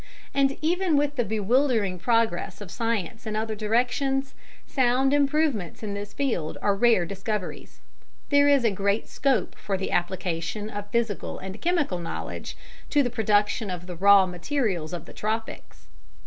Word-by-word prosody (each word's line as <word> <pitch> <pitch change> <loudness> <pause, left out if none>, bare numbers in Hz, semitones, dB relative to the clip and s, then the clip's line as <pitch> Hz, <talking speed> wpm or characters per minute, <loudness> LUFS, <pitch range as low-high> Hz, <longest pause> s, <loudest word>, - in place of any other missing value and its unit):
And 275 0 +2
even 345 -1 +2
with 290 0 +1
the 245 - +1
bewildering 220 -2 +1
progress 220 -4 +1
of 200 -4 -9
science 225 -2 -2
in 215 - -2
other 220 0 -1
directions, 250 +5 0 0.3
sound 260 +1 +2
improvements 285 - +1
in 205 -2 -3
this 205 0 -5
field 230 - -2
are 205 - +3
rare 210 -3 +4
discoveries. 195 +2 -5 0.5
There 285 0 +5
is 280 -4 +4
great 200 +2 0
scope 265 -7 0
for 195 -2 -3
the 190 - -3
application 180 +3 -2
of 205 0 -6
physical 230 -3 -1
and 190 +2 -8
chemical 330 - +1
knowledge 85 - -6 0.3
to 290 - +3
the 245 - -1
production 210 -1 +1
of 180 -1 -5
the 180 -1 -7
raw 200 +2 +6
materials 180 - -2
of 175 - -5
the - - -12
tropics. 220 +1 -4
215 Hz, 150 wpm, -26 LUFS, 190-265 Hz, 0.5 s, raw